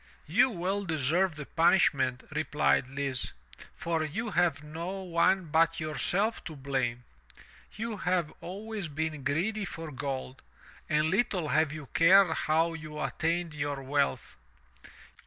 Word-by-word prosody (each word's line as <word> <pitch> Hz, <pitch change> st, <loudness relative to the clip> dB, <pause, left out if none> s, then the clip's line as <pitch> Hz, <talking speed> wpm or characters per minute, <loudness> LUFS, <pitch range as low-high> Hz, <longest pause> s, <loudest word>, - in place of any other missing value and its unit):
"You 260 Hz, -, +4 dB
well 195 Hz, 0 st, -2 dB
deserve 165 Hz, +2 st, +1 dB
the 150 Hz, -1 st, -6 dB
punishment," 145 Hz, -7 st, +3 dB
replied 70 Hz, -, +1 dB
Lise, 135 Hz, -2 st, -2 dB, 0.4 s
"for 165 Hz, -2 st, -1 dB
you 210 Hz, +9 st, -3 dB
have 155 Hz, -5 st, +1 dB
no 170 Hz, +6 st, -5 dB
one 180 Hz, +1 st, +2 dB
but 165 Hz, +1 st, +3 dB
yourself 180 Hz, +7 st, -1 dB
to 160 Hz, -, -6 dB
blame. 130 Hz, -3 st, -2 dB, 0.7 s
You 220 Hz, 0 st, -4 dB
have 180 Hz, -4 st, 0 dB
always 205 Hz, +1 st, -5 dB
been 155 Hz, -1 st, -3 dB
greedy 185 Hz, +10 st, 0 dB
for 165 Hz, -4 st, -6 dB
gold, 135 Hz, -1 st, -5 dB, 0.5 s
and 155 Hz, +1 st, +2 dB
little 190 Hz, -6 st, +1 dB
have 155 Hz, 0 st, +2 dB
you 155 Hz, -1 st, -7 dB
cared 180 Hz, 0 st, +6 dB
how 165 Hz, +2 st, +1 dB
you 155 Hz, -1 st, -7 dB
attained 165 Hz, 0 st, -1 dB
your 145 Hz, -2 st, -3 dB
wealth. 140 Hz, -, -1 dB
160 Hz, 130 wpm, -29 LUFS, 145-180 Hz, 0.7 s, cared